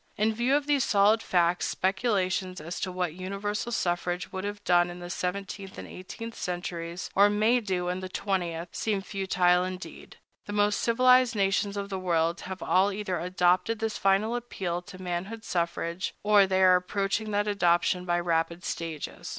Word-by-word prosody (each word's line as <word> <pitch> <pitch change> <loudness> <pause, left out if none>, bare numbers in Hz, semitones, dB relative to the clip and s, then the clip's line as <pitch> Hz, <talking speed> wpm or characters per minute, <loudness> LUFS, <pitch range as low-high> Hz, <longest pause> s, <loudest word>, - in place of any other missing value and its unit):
In 220 +1 +2
view 240 +5 +2
of 290 -1 +1
these 285 -3 +2
solid 210 +2 +4
facts, 175 -2 +1
speculations 190 -2 0
as 165 +3 -6
to 185 - -2
what 180 -3 -2
universal 200 +5 -4
suffrage 175 -3 -1
would 190 - -4
have 205 0 -5
done 175 -1 +3
in 175 - -8
the 175 0 -7
seventeenth 195 +1 -4
and - - -7
eighteenth 230 +5 -8
centuries, 175 -2 -5
or 200 +1 +6
may 215 +4 +3
do 185 -5 -2
in 180 +1 -2
the 185 0 -6
twentieth, 175 -4 -2
seem 210 -3 -1
futile 180 -2 +2
indeed. 185 0 -8 0.3
The 205 - -5
most 205 0 +2
civilized 255 +1 +4
nations 200 0 +1
of 200 0 -4
the 190 -1 -3
world 170 -1 0
have 190 -1 -6
all 190 +2 +3
either 195 -4 -3
adopted 180 +4 +1
this 220 0 -3
final 195 +4 +2
appeal 190 -8 -3
to 185 +1 -12
manhood 185 +5 -4
suffrage, 170 0 -2
or 205 -1 +5
they 190 0 +2
are 185 -1 +7
approaching 195 +3 -2
that 205 0 0
adoption 180 -2 +2
by 175 -1 0
rapid 170 0 -1
stages. 165 -3 -5
190 Hz, 175 wpm, -28 LUFS, 175-205 Hz, 0.3 s, are